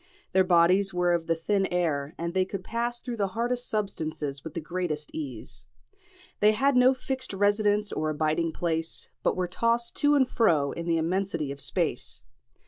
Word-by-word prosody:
Their 190 - +4
bodies 185 +2 +4
were 175 0 +2
of 165 -1 -1
the 165 - +2
thin 195 +4 0
air, 155 -5 -1
and 170 0 -3
they 190 0 +3
could 190 0 -6
pass 240 +3 -2
through 245 -2 -5
the 200 -2 +1
hardest 245 +1 -1
substances 155 -9 -3
with 160 -1 -8
the - - -1
greatest 160 -2 -4
ease. 110 - -7 0.7
They 210 +1 +5
had 270 +5 +2
no 250 +1 +5
fixed 260 -2 -4
residence 205 +1 +2
or 155 0 -1
abiding 155 +2 0
place, 165 -1 -2
but - - +1
were 185 -1 -1
tossed 230 +5 0
to 290 0 +4
and 265 -3 +4
fro 160 - +2
in 170 0 -6
the 165 -1 +2
immensity 165 -3 -1
of 140 0 -7
space. - - -2
180 Hz, 180 wpm, -27 LUFS, 160-215 Hz, 0.7 s, They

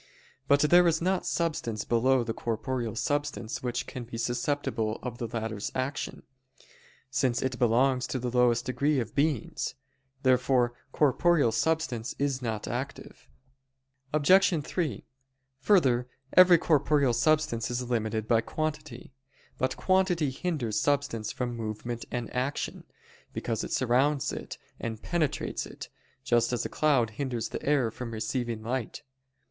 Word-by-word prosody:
But 140 0 +5
there 175 +4 +6
is 165 -1 +2
not 185 +2 0
substance 135 -10 -1
below 125 +2 +3
the 115 -1 -3
corporeal 120 0 -3
substance 145 -4 -2
which 125 -1 -2
can 125 - -7
be 115 0 -8
susceptible 120 -2 -1
of 120 -2 -5
the 120 - -2
latter's 110 -2 -4
action; 130 +2 -3 0.9
since 130 -3 +1
it 130 -1 -2
belongs 125 +2 +3
to - - -2
the 125 -1 -3
lowest 120 0 +3
degree 140 +3 +1
of 115 -2 -4
beings. 140 -3 -1 0.5
Therefore 125 -1 +3 0.2
corporeal 150 -1 +3
substance 130 -4 -1
is 140 -2 -1
not 110 -3 -3
active. - - -6 0.8
Obj. 160 +2 +4
3: 165 -6 -2 0.5
Further, 130 -8 +3 0.3
every 180 -1 +8
corporeal 145 -5 +2
substance 130 -2 +1
is 125 0 -3
limited 110 -2 -1
by 115 -1 +4
quantity. 150 -4 -5 0.5
But 130 0 0
quantity 185 -6 +2
hinders 135 - -2
substance 140 -7 0
from 120 -1 -3
movement 115 +1 -5
and 120 -1 -4
action, 130 +3 -2 0.5
because 115 -2 -2
it - - -6
surrounds 135 +3 +2
it - - -7 0.2
and 110 -2 -4
penetrates 160 -5 -1
it: - - -10 0.3
just 120 -3 +2
as 120 - -1
a - - -2
cloud 135 -7 +2
hinders 120 0 -3
the - - -5
air 140 -6 +2
from 125 +1 -6
receiving 115 0 -3
light. 125 +4 -3
125 Hz, 135 wpm, -28 LUFS, 115-145 Hz, 0.9 s, every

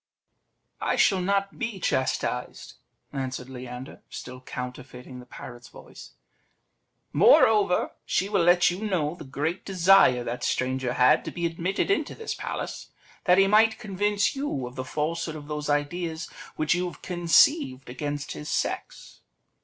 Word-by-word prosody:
"I - - +1
shall 190 -2 +3
not 195 +1 -1
be 230 -5 -3
chastised," 130 -6 -2 0.4
answered 130 -2 -4
Leander, 125 0 -8
still 125 0 -8
counterfeiting 125 0 -8
the 125 - -13
parrot's 120 -1 -10
voice; - - -13 1.0
"moreover, 205 -5 +5
she 185 +4 0
will 200 -3 +1
let 175 0 +5
you 185 +5 -5
know 170 -8 0
the 175 - -10
great 150 +6 -3
desire 185 -9 +5
that 120 +1 -5
stranger 130 -1 -1
had 140 +6 +4
to - - -3
be 170 -1 -3
admitted 170 - -1
into 400 - 0
this 450 - -4
palace, - - -5 0.4
that 180 0 +5
he 195 - +6
might 220 +2 +4
convince 205 +1 0
you 270 - -3
of 125 - -8
the 130 - -4
falsehood 155 +4 -3
of 145 -1 -9
those 150 0 -4
ideas 160 +3 -1 0.3
which 155 0 +1
you 180 +1 -1
have 175 - -10
conceived 175 - +3
against 145 +3 -4
his 150 0 -7
sex." - - -3
165 Hz, 145 wpm, -26 LUFS, 130-195 Hz, 1.0 s, he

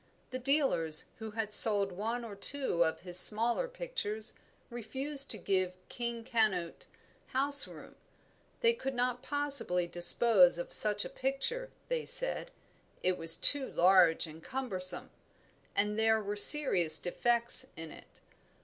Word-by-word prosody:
The 255 - -8
dealers 255 - -2
who 220 -1 -11
had 215 -1 -8
sold 205 -2 +3
one 225 +6 -8
or 210 -3 -13
two 200 -4 -4
of 160 -1 -6
his 180 0 +4
smaller 230 - +2
pictures 485 - -9 0.4
refused 270 +5 -3
to - - -6
give 185 -2 -5 0.2
"King 235 -1 -9
Canute" 215 -8 -5 0.4
house 280 +1 +3
room. - - -17 0.7
They 465 0 0
could 270 - -9
not 245 0 -5
possibly 280 -12 -2
dispose 175 +2 +1
of 175 - -11
such 210 -1 +1
a - - -8
picture, 475 - -7 0.2
they - - -7
said; - - +2 0.5
it 185 0 -3
was 165 -2 +5
too 280 -2 +3
large 180 -2 -1
and 160 0 -17
cumbersome, 225 -9 -5 0.6
and 210 +1 -4
there 220 0 -1
were 205 -1 -9
serious 205 - +7
defects 235 +7 +5
in 160 -1 -12
it. - - -20
220 Hz, 140 wpm, -27 LUFS, 185-270 Hz, 0.7 s, serious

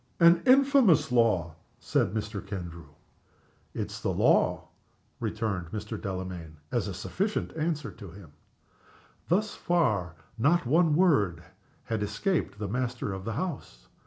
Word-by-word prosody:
"An 170 0 +6
infamous 265 - +5
law!" 105 -10 +2 0.3
said - - 0
Mr. 105 -1 -4
Kendrew. 85 -5 -7 0.9
"It - - -3
is - - -8
the - - -1
law," - - +2 0.5
returned 105 -6 -2
Mr. 105 +3 -6
Delamayn, 90 -5 -5
as 120 -4 0
a 100 - -4
sufficient 195 - -2
answer 155 -1 -2
to 100 -5 -11
him. 85 -3 -13 1.0
Thus 205 +5 +1
far 110 - 0 0.2
not 160 +7 +3
a - - -4
word 150 - +3 0.4
had 110 -2 -3
escaped 165 - -1
the 105 0 -4
master 120 -1 -2
of 95 0 -7
the 115 - -2
house. 115 - -5
110 Hz, 130 wpm, -28 LUFS, -, 1.0 s, An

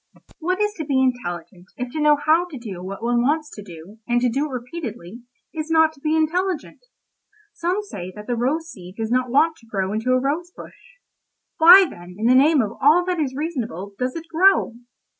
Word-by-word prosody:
"What 365 +4 -1
is 420 0 0
to 315 - -3
be 280 -3 0
intelligent 180 -8 -3
if 250 -1 -5
to 310 - -4
know 300 0 +5
how 325 +3 +4
to 310 -6 -9
do 205 -7 -8
what 195 +4 -7
one 240 0 +1
wants 300 +4 0
to 210 - -9
do, 185 +2 -13
and 240 0 +2
to 250 - +2
do 275 +6 -1
it - - -11
repeatedly, 240 - -7 0.3
is 310 -1 -5
not 320 -1 +4
to 295 - -21
be 310 +2 0
intelligent? 345 +5 -1 0.7
Some 360 +5 -2
say 185 - -8
that 210 0 -9
the 245 - -2
rose 285 +8 -1
seed 180 0 -12
does 225 0 -3
not 250 0 +1
want 315 +6 +2
to 230 - -21
grow 195 -2 -2
into 225 +4 0
a 255 - +3
rose 300 +7 -2
bush. - - -15 0.6
Why, 360 +4 +9
then, 175 - -12
in 220 - -3
the 245 - +5
name 280 +1 +5
of 205 - -4
all 315 +6 +5
that 360 -2 -2
is 270 -4 -2
reasonable, 235 - -4
does 255 0 -2
it 330 0 -6
grow? 350 -4 +3
260 Hz, 215 wpm, -22 LUFS, 220-320 Hz, 0.7 s, Why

